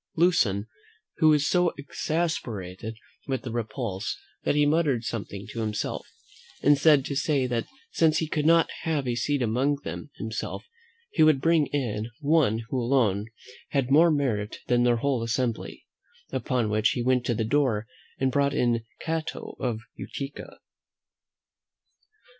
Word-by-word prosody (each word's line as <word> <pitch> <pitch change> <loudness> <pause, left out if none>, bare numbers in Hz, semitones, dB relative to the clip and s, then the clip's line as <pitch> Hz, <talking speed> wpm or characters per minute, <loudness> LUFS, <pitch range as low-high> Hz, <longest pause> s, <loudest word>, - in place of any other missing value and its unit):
Lucan 155 - +3 0.6
was 155 -2 +5
so 180 +3 +2
exasperated 115 - -3 0.3
with 135 -1 -2
the 125 - -5
repulse, 110 -3 -3 0.3
that - - +1
he 150 0 +4
muttered 145 -6 +2
something 100 -3 -5
to 115 - -6
himself, 105 -2 -3 0.6
and 145 - +6
was 145 0 +3
heard 150 -4 +6
to 140 - -3
say 140 -2 +1
that 120 -2 -1 0.2
since 160 -1 +3
he 160 - 0
could 150 0 0
not 165 0 +5
have 150 -5 -1
a 120 - +1
seat 135 +3 0
among 125 +6 +1
them - - -6
himself, 110 -1 -5 0.5
he 160 - 0
would 155 -3 +6
bring 160 0 +3
in 115 -6 -2
one 140 -7 +2
who 130 - -1
alone 115 -5 +2 0.4
had 135 -2 0
more 165 +4 +7
merit 125 -9 0
than 120 0 +2
their 120 -1 +3
whole 130 0 0
assembly: 115 0 -2 0.5
upon 125 -6 0
which 105 0 +2
he 120 - -2
went 125 0 +2
to 120 -1 0
the 110 - -1
door 115 -4 +1 0.3
and 130 0 +1
brought 140 +1 +1
in 120 -4 +1 0.2
Cato 160 -1 -4
of 115 -4 -2
Utica. 140 0 -7
130 Hz, 150 wpm, -26 LUFS, 115-150 Hz, 0.6 s, more